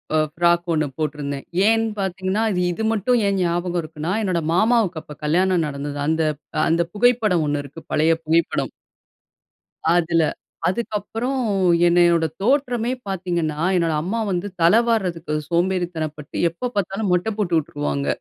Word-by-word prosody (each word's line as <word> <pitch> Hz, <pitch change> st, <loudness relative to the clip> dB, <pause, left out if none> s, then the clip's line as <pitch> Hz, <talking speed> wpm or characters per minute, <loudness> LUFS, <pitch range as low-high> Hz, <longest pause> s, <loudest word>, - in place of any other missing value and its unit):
அ -, -, +4 dB
frock 175 Hz, +1 st, +2 dB
1 155 Hz, -2 st, +1 dB
போட்டுருந்தேன். 145 Hz, -2 st, -3 dB, 0.2 s
ஏன் 225 Hz, 0 st, +3 dB
பார்த்தீர்கன்னா, 190 Hz, +2 st, -1 dB
இது 180 Hz, -, 0 dB
இது 220 Hz, -, -4 dB
மட்டும், 230 Hz, +4 st, +2 dB
ஏன் 195 Hz, -1 st, +1 dB
ஞாபகம் 175 Hz, 0 st, 0 dB
இருக்குன்னா, 155 Hz, +2 st, -5 dB
என்னோட 180 Hz, -4 st, 0 dB
மாமாவுக்கு, 210 Hz, -5 st, +2 dB
அப்ப 150 Hz, -, -11 dB
கல்யாணம் 175 Hz, +1 st, +2 dB
நடந்தது. 145 Hz, 0 st, -5 dB
அந்த 160 Hz, +1 st, +1 dB, 0.4 s
அ -, -, +2 dB
அந்த 165 Hz, +1 st, +3 dB
புகைப்படம் 215 Hz, -6 st, +3 dB
1 145 Hz, 0 st, 0 dB
இருக்கு. 155 Hz, +4 st, -11 dB
பழைய 160 Hz, +2 st, +4 dB
புகைப்படம். 165 Hz, +1 st, +1 dB, 1.2 s
அதுல. 170 Hz, -1 st, +2 dB, 0.5 s
அதுக்கப்புறம், 225 Hz, +5 st, -2 dB, 0.5 s
என்னையோட 170 Hz, -1 st, +4 dB, 0.2 s
தோற்றமே 245 Hz, 0 st, +1 dB, 0.2 s
பார்த்தீங்கன்னா, 170 Hz, -5 st, -2 dB, 0.2 s
என்னோட 165 Hz, -2 st, +1 dB
அம்மா 205 Hz, +7 st, -2 dB
வந்து 180 Hz, +2 st, -1 dB
தல 170 Hz, +5 st, +6 dB
வார்றதுக்கு 180 Hz, -8 st, -1 dB, 0.2 s
சோம்பேறித்தனப்பட்டு, 170 Hz, -4 st, -2 dB
எப்ப 240 Hz, +9 st, -5 dB
பார்த்தாலும் 195 Hz, +1 st, -1 dB
மொட்ட 180 Hz, +5 st, +1 dB
போட்டுட்டுருவாங்க 145 Hz, -6 st, -1 dB
175 Hz, 130 wpm, -22 LUFS, 160-200 Hz, 1.2 s, தல